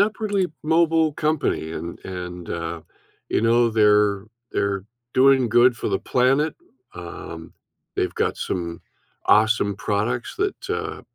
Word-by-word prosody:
upwardly 205 -2 +1 0.2
mobile 160 0 +3
company, 150 - -1
and 85 +1 -6
and, 90 -2 -6
uh, 85 0 -4 0.5
you - - +1
know, 115 +1 +3
they're 105 -2 +3 0.3
they're 100 -1 -1 0.3
doing 130 -2 +5
good 120 +1 +5
for - - -3
the 95 -2 0
planet, 135 +7 +2 0.4
um, 85 -2 -8 0.4
they've - - -1
got - - 0
some 85 -2 -4 0.5
awesome 110 -1 +4
products 110 +5 -2
that, 400 0 -2
uh, - - -3
110 Hz, 125 wpm, -23 LUFS, 95-135 Hz, 0.5 s, doing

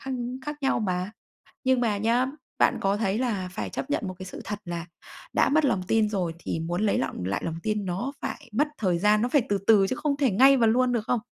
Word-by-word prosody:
khác 270 - -5 0.3
khác 295 0 -4
nhau 270 -3 +2
mà. 185 -1 -1 0.5
Nhưng 260 -1 +3
mà 215 -4 +1
nhá, 235 +4 +2 0.3
bạn - - +4
có 195 +1 +1
thấy 205 0 0
là 205 -8 -1
phải - - -4
chấp - - -5
nhận 215 -8 -1
một 185 - -5
cái 185 - -7
sự - - -8
thật 210 -1 -4
là 170 -1 -5 0.5
đã - - +3
mất 305 +2 +3
lòng 210 -9 +1
tin 220 -1 +3
rồi 185 -5 -1
thì 165 - -3
muốn 175 +4 -2
lấy 215 - +2
lọng 110 -9 -3
lại 100 +2 -2
lòng 165 0 -3
tin 210 -2 -1
nó 190 +10 -3
phải 290 -6 -6
mất 295 +7 +2
thời 180 -5 +1
gian, 210 +3 +3
nó 245 - +1
phải 275 -1 +3
từ 200 -1 +1
từ 205 -3 +6
chứ 255 - -2
không 285 0 -1
thể 275 -5 +2
ngay 265 +7 +6
và 230 -3 +3
luôn 250 +2 +3
được 225 -3 0
không? 245 -3 +1
215 Hz, 255 wpm, -26 LUFS, 185-255 Hz, 0.5 s, từ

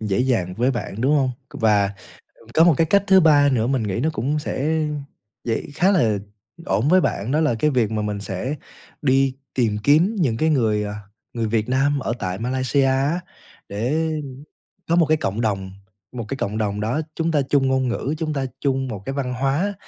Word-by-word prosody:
dễ 105 -3 -1
dàng 115 -9 0
với 125 +5 +1
bạn, 115 -4 -4
đúng 140 +5 +3
hông? 135 -3 +2 0.2
C - - -7
và, 105 -3 +3 0.4
ừm, 115 - -21
có 160 - +6
một 170 -2 +6
cái 165 - +3
cách 200 +2 +3
thứ 190 -1 +7
3 145 -4 +5
nữa 115 -3 +1
mình 130 -3 0
nghĩ 100 +1 -2
nó 155 +5 +1
cũng 145 +6 -1
sẽ 155 +2 -1 0.6
dễ 115 -2 -1
khá 185 +6 +3
là 115 - +2 0.5
ổn 105 +8 +1
với 185 +2 +5
bạn 110 - -1
đó 150 - +2
là 150 -7 +2
cái 150 - +3
việc 120 -6 +1
mà 110 -1 -1
mình 105 -1 -3
sẽ 100 +8 -3 0.5
đi 135 -1 +3 0.2
tìm 115 -5 +1
kiếm 165 +10 +4
những 125 -10 +1
cái 160 +4 +2
người, 110 -7 +2
à, 105 - -4 0.4
người 115 -2 -1
Việt 110 +1 0
Nam 140 +2 +2
ở 120 - -2
tại 95 0 -3
Malaysia 130 +3 +1
á 135 +6 +1 0.5
để 145 +11 -1 0.8
có 170 - +3
một 170 - +4
cái 155 +1 +2
cộng 110 -7 -2
đồng, 95 -4 -1 0.4
một 120 -2 -5
cái 135 - -4
cộng 105 -1 -2
đồng 105 -2 -1
đó 115 +9 0
chúng 165 0 0
ta 150 -3 +2
chung 140 -2 +3
ngôn 130 -1 +1
ngữ, 130 +4 -2
chúng 155 -1 -2
ta 135 -2 -1
chung 135 -2 0
một 105 -6 -6
cái 135 - -3
văn 130 -2 -2
hóa 140 +10 0
130 Hz, 215 wpm, -22 LUFS, 110-150 Hz, 0.8 s, thứ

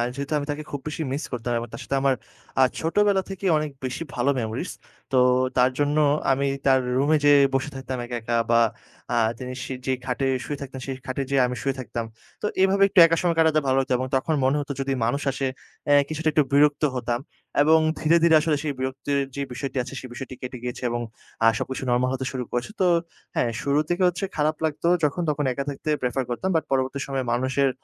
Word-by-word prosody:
যেহেতু 140 +2 -4
আমি 145 - -2
তাকে 150 +1 -5
খুব 140 -2 -4
বেশি 150 - -4
miss 140 - -2
করতাম 120 0 -3
এবং 115 0 -4
তার - - -7
সাথে 140 - -2
আমার 135 -1 +3 0.5
আ - - +8 0.2
ছোটবেলা 195 +4 +2
থেকেই 195 -1 -2
অনেক 150 -1 -2
বেশি 130 +5 -3
ভালো 125 +3 +1
memories। 110 -1 -3 0.4
তো 130 - +2 0.4
তার 125 0 +5
জন্য 145 +1 +1 0.3
আমি 135 +1 +1 0.2
তার 135 -1 +5 0.2
রুমে 150 +3 +3
যেয়ে 145 -1 +7 0.2
বসে 135 +2 0
থাকতাম 130 -1 -5
একা, 120 - -5
একা 115 +1 -1 0.2
বা 115 0 +5 0.5
আ - - +2 0.2
তিনি 130 0 -6
সি 130 - -5
যে 130 - +1
খাটে 130 +1 -1 0.2
শুয়ে 145 - -4
থাকতেন 130 -1 -7
সেই 135 - -3
খাটে 130 +1 -2
যেয়ে 140 -1 +3
আমি 125 - -4
শুয়ে 135 -1 -1
থাকতাম। 115 -1 -4 0.4
তো - - -2 0.2
এভাবে 195 +1 +4
একটু 185 - +4
একা 165 0 +2
সময় 175 -2 +1
কাটাতে 160 -1 +4
ভালো 130 - +3
লাগতো, 130 -1 0
এবং 130 +1 -2
তখন 135 +4 +1
মনে 135 +2 +3
হতো 145 - -5
যদি 135 0 -1
মানুষ 140 +5 0
আসে 135 0 -2 0.6
কিছুটা 155 0 0
এ - - 0
একটু 150 0 +4
বিরক্ত 145 +1 +4
হতাম 120 -1 -1 0.4
এবং 160 +2 +6 0.2
ধীরে, 165 +2 +4
ধীরে 165 -1 +6
আসলে 155 -1 +1
সেই 150 -2 -1
বিরক্তির 135 +2 -1 0.2
যে 140 - -3
বিষয়টি 135 +2 -4
আছে 130 - -9
সেই 130 - -9
বিষয়টি 130 +1 -7
কেটে 125 0 -6
গিয়েছে, 125 +1 -5
এবং 120 0 -2 0.6
সবকিছু 130 +2 -4
normal 125 +1 +2
হতে 130 0 -3
শুরু 130 -2 -3
করেছে। 120 +9 -2
তো - - +4 0.5
হ্যাঁ, 120 - +1
শুরু 140 +1 +2
থেকে 175 +2 +1
হচ্ছে 180 +2 -1
খারাপ 155 0 +1
লাগতো 155 +2 -1 0.2
যখন, 150 +4 +1
তখন 145 0 0
একা 140 - -3
থাকতে 145 +2 -5
prefer 125 +1 0
করতাম। 185 +11 -2
বাট 160 - +2
পরবর্তী 135 +1 0
সময়ে 135 -1 -2
মানুষের 130 +3 +1
135 Hz, 215 wpm, -24 LUFS, 130-150 Hz, 0.6 s, আ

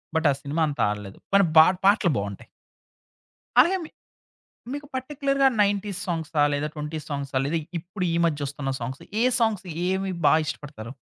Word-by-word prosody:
But 160 - +1
ఆ - - +2
సినిమాంత 150 0 -1
ఆడలేదు. 105 -2 -6 0.2
కానీ 200 -2 +6
బాట్ 180 +3 +6
పాటలు 200 -4 +4
బావుంటాయి. 100 -1 -5 1.1
అలాగే 345 +9 +4
మీ - - -9 0.8
మీకు 290 +1 -5
పర్టిక్యులర్‌గా 275 +1 0
90స్ 200 -1 0
సాంగ్స్ 165 -3 -3
సాంగ్సా 145 -2 +3
లేదా 150 +1 -1
20స్ 150 +1 -5
సాంగ్సా 140 -2 -2
లేదా 160 +4 0 0.2
ఇప్పుడు 180 +3 -5
ఈ - - +1
మద్యోస్తున్న 145 -3 -2
సాంగ్స్? 130 +4 -5 0.2
ఏ - - +3 0.2
సాంగ్స్ 215 -4 +1 0.3
ఏమి 190 0 -1 0.2
బాగిష్టపడతారు? 145 -6 0
160 Hz, 145 wpm, -25 LUFS, 145-200 Hz, 1.1 s, కానీ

